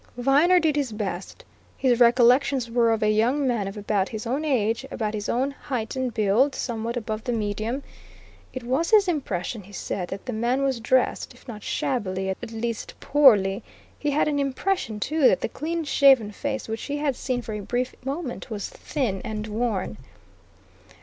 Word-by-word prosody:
Viner 290 +9 +5
did 315 -4 +1
his 280 -5 0
best. 195 -4 -5 0.3
His 250 -3 +2
recollections 245 +1 +4
were 235 -1 +3
of 225 -1 0
a 215 - +4
young 245 +7 +2
man 230 -6 0
of 195 - -7
about 205 -2 0
his 220 +1 -6
own 265 +6 -1
age, 235 -5 +1
about 215 -5 -3
his 210 -1 -3
own 260 +4 +1
height 255 -5 -4
and 260 -1 -1
build, 220 +6 +2
somewhat 235 0 -3
above 220 -1 -4
the 245 - -2
medium; 220 +4 -2 0.7
it 255 - -6
was 265 +8 0
his 420 -3 +5
impression, 235 - -2
he 200 +1 -15
said, 185 -2 -4
that 195 +2 -7
the 250 - -3
man 240 +5 0
was 265 -3 0
dressed, 250 +2 +1
if - - -20
not 215 -3 -7
shabbily, 190 -8 -2
at 225 +5 -6
least 230 0 -4
poorly; 210 -10 +4 0.4
he 295 - -1
had 290 +2 +2
an 290 -1 0
impression, 275 - -1
too, 300 +4 +3
that - - +3
the - - 0
clean 330 +3 -3
shaven 270 -7 +5
face 270 +4 -4
which 225 0 -4
he 290 0 -3
had 290 -3 0
seen 250 -1 -2
for 220 - -5
a 210 - -3
brief 245 +5 -2
moment 270 -1 -4
was 210 -3 -4
thin 240 -11 -3
and 215 -2 -4
worn. 215 - -2
240 Hz, 185 wpm, -25 LUFS, 215-275 Hz, 0.7 s, Viner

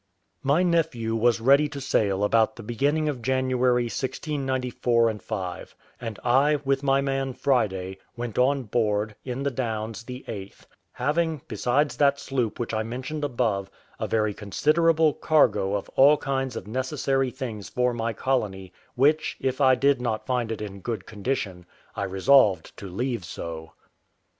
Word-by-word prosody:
My 145 +6 +3
nephew 155 -10 +1
was 115 +1 +3
ready 140 +5 +4
to 145 -1 -6
sail 105 -7 +1
about 110 +1 +3
the 115 - -9
beginning 145 +8 0
of 140 -5 -2
January 130 -1 +2
1694 125 -3 0
5; 95 -6 -5 0.3
and 115 -3 -5
I, 135 +5 +4
with 135 0 +1
my 135 -1 +2
man 135 -1 -1
Friday, 95 -9 0 0.2
went 120 -2 -3
on 135 +1 +3
board, 105 -2 0
in 130 +1 -4
the 140 - 0
Downs, 115 -3 -3
the 125 +2 -9
8th; 100 -2 -8 0.3
having, 155 +3 0
besides 125 +7 0
that 140 -1 +3
sloop 125 -6 -2
which 120 -1 -3
I 110 - 0
mentioned 130 +7 -5
above, 115 -8 -1 0.3
a - - -2
very 110 -2 +1
considerable 155 - +2
cargo 120 -10 +2
of 100 - -3
all 145 +3 +6
kinds 135 -2 -2
of - - -5
necessary 130 +3 -1
things 115 -6 -6
for 125 0 +1
my 115 0 -1
colony, 100 -6 -2 0.2
which, 145 +5 +2
if 130 +1 -1
I 130 -1 +6
did 140 -1 +2
not 110 -3 -2
find 125 -3 -1
in 105 -3 -5
good 115 +2 -4
condition, 100 -5 -4 0.3
I 100 - -2
resolved 95 -2 +3
to 100 - -7
leave 120 +3 -3
so. 80 -2 -7
125 Hz, 155 wpm, -25 LUFS, 110-135 Hz, 0.3 s, all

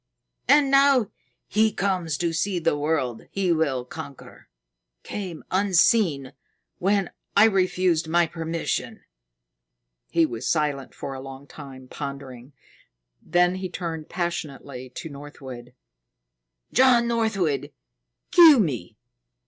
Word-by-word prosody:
And 285 -1 +5
now 275 -5 +4 0.4
he 220 +1 +2
comes 180 -7 -1
to 170 -1 -1
see 180 +3 -1
the 165 -2 +1
world 145 -6 -2
he 190 -3 0
will 145 -6 0
conquer 140 0 -11 0.5
came 185 -6 -6
unseen 185 - +2 0.5
when 195 0 +1 0.3
I 205 - +8
refused 185 -5 +1
my 170 +1 +3
permission." 165 0 -4 1.1
He 165 -1 +3
was 120 -4 -5
silent 150 -4 -1
for 135 - -6
a 135 - -7
long 135 +1 -10
time, 130 -2 -11
pondering. 140 -2 -8 0.7
Then 175 0 +2
he 185 0 -5
turned 165 -3 -5
passionately 140 -7 -5
to 170 - -6
Northwood. 135 -4 -10 1.0
"John 245 -2 +5
Northwood, 220 -10 0 0.6
kill 330 -5 +9
me! 120 - -2
165 Hz, 110 wpm, -24 LUFS, 140-195 Hz, 1.1 s, kill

